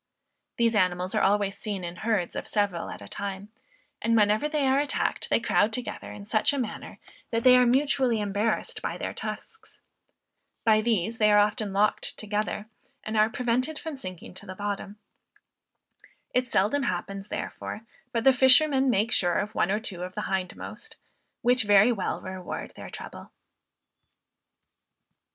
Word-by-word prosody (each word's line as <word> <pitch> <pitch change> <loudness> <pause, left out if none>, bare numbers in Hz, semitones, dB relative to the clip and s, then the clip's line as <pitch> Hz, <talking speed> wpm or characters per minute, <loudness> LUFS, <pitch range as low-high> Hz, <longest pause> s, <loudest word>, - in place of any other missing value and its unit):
These 235 -1 +3
animals 180 -2 +1
are - - +2
always 200 0 +2
seen 200 -3 -4
in 175 +1 -6
herds 215 -6 -1
of - - -4
several 200 -5 -1
at - - -8
a - - -10
time; 200 0 -5 0.5
and 230 0 +2
whenever 215 +7 +3
they 300 -2 0
are 265 +1 +3
attacked 290 0 -1
they - - +3
crowd 225 -2 +2
together 240 +1 -5
in 200 - -9
such 215 +5 +2
a - - -1
manner, 240 -5 -5 0.3
that 230 0 -1
they 255 -1 +8
are 250 -1 +5
mutually 260 -2 +2
embarrassed 205 +2 -1
by - - -3
their - - -4
tusks. 450 - -8 0.9
By 215 -1 +5
these 225 -1 0
they 210 -1 +5
are 210 - +6
often 210 0 +2
locked 205 +2 +1
together, 210 0 -2 0.4
and 215 - -4
are 215 0 +4
prevented 250 +5 -1
from 320 -2 -6
sinking 185 -11 -8
to 190 - -8
the 185 - -7
bottom. 205 0 -4 1.4
It 250 -1 +1
seldom 210 +10 +2
happens, 195 -3 -3
therefore, 215 - -5 0.3
but 230 -2 -1
the 270 - +6
fishermen 265 +1 +5
make 225 0 +2
sure 175 -5 +2
of 210 +1 -2
one 175 - +1
or 210 +2 +1
two 200 -6 -5
of 185 +1 -6
the 210 - -2
hindmost, 190 -1 -5 0.5
which 245 -1 +4
very 205 +3 +6
well 200 -6 -2
reward 185 -1 -6
their - - -10
trouble. - - -9
215 Hz, 165 wpm, -27 LUFS, 195-245 Hz, 1.4 s, they